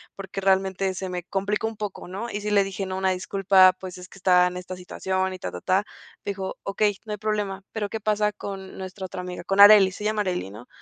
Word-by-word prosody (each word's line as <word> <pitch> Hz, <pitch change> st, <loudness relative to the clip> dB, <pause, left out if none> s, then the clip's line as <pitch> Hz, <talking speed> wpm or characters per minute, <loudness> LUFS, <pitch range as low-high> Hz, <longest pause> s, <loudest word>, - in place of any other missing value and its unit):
porque 195 Hz, 0 st, -6 dB
realmente 190 Hz, 0 st, +2 dB
se 190 Hz, +1 st, -4 dB
me 180 Hz, -1 st, -3 dB
complicó 200 Hz, +4 st, -1 dB
un 225 Hz, -1 st, -6 dB
poco, 205 Hz, -4 st, -5 dB
¿no? 195 Hz, +6 st, -5 dB
Y 205 Hz, -, -4 dB
sí 210 Hz, -, -3 dB
le 200 Hz, -1 st, +5 dB
dije: 195 Hz, 0 st, -4 dB
"No, 185 Hz, 0 st, -4 dB
una 190 Hz, 0 st, +1 dB
disculpa, 185 Hz, 0 st, +4 dB
pues, 185 Hz, -1 st, -8 dB
es 180 Hz, 0 st, -11 dB
que -, -, -15 dB
estaba 180 Hz, -1 st, +5 dB
en 180 Hz, 0 st, -5 dB
esta 180 Hz, 0 st, -6 dB
situación", 185 Hz, +1 st, -2 dB
y -, -, -6 dB
ta -, -, -5 dB
ta-ta. 190 Hz, +2 st, 0 dB, 0.4 s
Dijo: 195 Hz, -1 st, -4 dB
"Okey, 205 Hz, 0 st, +1 dB
no 215 Hz, -, -7 dB
hay -, -, -4 dB
problema, 205 Hz, -2 st, -2 dB
pero, 215 Hz, -2 st, -2 dB
¿qué 220 Hz, -, -4 dB
pasa 210 Hz, 0 st, +1 dB
con 195 Hz, -2 st, -7 dB
nuestra 190 Hz, 0 st, -6 dB
otra 180 Hz, 0 st, -6 dB
amiga?", 180 Hz, 0 st, -6 dB
con 195 Hz, +1 st, -1 dB
Arely, 205 Hz, -2 st, +9 dB
se 200 Hz, -, -8 dB
llama 215 Hz, 0 st, +1 dB
Arely, 180 Hz, -, -2 dB
¿no? 110 Hz, +5 st, -11 dB
195 Hz, 240 wpm, -25 LUFS, 185-205 Hz, 0.4 s, Arely